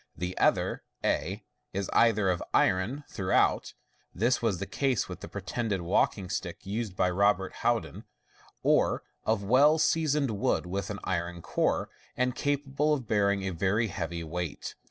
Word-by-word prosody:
The 90 Hz, +1 st, -3 dB
other, -, -, +2 dB, 0.2 s
a, -, -, -1 dB, 0.3 s
is 100 Hz, -1 st, -2 dB
either 105 Hz, -5 st, +4 dB
of 85 Hz, -, -2 dB
iron 100 Hz, +10 st, +2 dB
throughout 95 Hz, -1 st, +1 dB, 0.4 s
(this 120 Hz, +7 st, +2 dB
was 110 Hz, -6 st, +1 dB
the 100 Hz, -, -4 dB
case 130 Hz, 0 st, 0 dB
with -, -, -7 dB
the -, -, -8 dB
pretended 110 Hz, -6 st, -3 dB
walking 90 Hz, +2 st, +1 dB
stick 90 Hz, -2 st, -5 dB
used 105 Hz, 0 st, -3 dB
by 90 Hz, -1 st, +2 dB
Robert 95 Hz, 0 st, +1 dB
Houd -, -, +2 dB
in) -, -, -10 dB, 0.6 s
or -, -, +3 dB, 0.2 s
of 110 Hz, -2 st, +1 dB
well 140 Hz, +9 st, +5 dB
sea 160 Hz, 0 st, +2 dB
soned 140 Hz, -3 st, +1 dB
wood 100 Hz, -3 st, 0 dB
with 95 Hz, +2 st, -3 dB
an 100 Hz, -, -4 dB
iron 85 Hz, -1 st, -3 dB
core, -, -, 0 dB, 0.3 s
and 125 Hz, 0 st, +1 dB
capable 145 Hz, +1 st, 0 dB
of 130 Hz, -6 st, -7 dB
bearing 100 Hz, -2 st, +2 dB
a 95 Hz, -, -1 dB
very 100 Hz, +6 st, +1 dB
heavy 85 Hz, 0 st, -4 dB
weight. 85 Hz, -1 st, -4 dB
100 Hz, 160 wpm, -29 LUFS, 90-125 Hz, 0.6 s, well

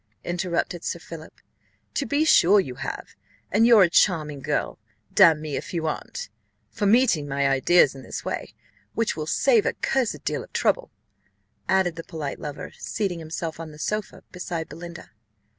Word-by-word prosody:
interrupted 175 Hz, -1 st, -2 dB
Sir -, -, -2 dB
Philip: 165 Hz, -1 st, -11 dB, 0.5 s
"to 280 Hz, -, -1 dB
be 290 Hz, +2 st, +2 dB
sure 205 Hz, -, +6 dB
you 135 Hz, -10 st, -2 dB
have, -, -, -6 dB, 0.4 s
and 225 Hz, +4 st, +4 dB
you're 230 Hz, -4 st, +8 dB
a 175 Hz, -, +3 dB
charming 155 Hz, -7 st, +2 dB
girl -, -, -2 dB, 0.3 s
damn 160 Hz, -2 st, +7 dB
me 155 Hz, -2 st, -4 dB
if -, -, -5 dB
you 165 Hz, -1 st, -1 dB
aren't 485 Hz, -, -4 dB, 0.4 s
for 205 Hz, -3 st, -1 dB
meeting 205 Hz, -, +4 dB
my 140 Hz, 0 st, +1 dB
ideas 135 Hz, +3 st, +4 dB
in 135 Hz, -, -10 dB
this 120 Hz, -, -7 dB
way, -, -, -4 dB, 0.4 s
which 230 Hz, -1 st, 0 dB
will 155 Hz, -1 st, -4 dB
save 460 Hz, -, +3 dB
a -, -, +1 dB
cursed 260 Hz, -4 st, -1 dB
deal -, -, -2 dB
of -, -, -16 dB
trouble," -, -, +1 dB, 0.8 s
added 185 Hz, -3 st, +2 dB
the 165 Hz, -, -5 dB
polite 155 Hz, -5 st, -5 dB
lover, 145 Hz, -1 st, -6 dB
seating 195 Hz, -6 st, -2 dB
himself 160 Hz, 0 st, -5 dB
on 165 Hz, -1 st, -6 dB
the 150 Hz, -, -13 dB
sofa, 210 Hz, +6 st, -3 dB
beside 175 Hz, -2 st, -4 dB
Belinda. 170 Hz, +2 st, -10 dB
170 Hz, 170 wpm, -25 LUFS, 155-210 Hz, 0.8 s, you're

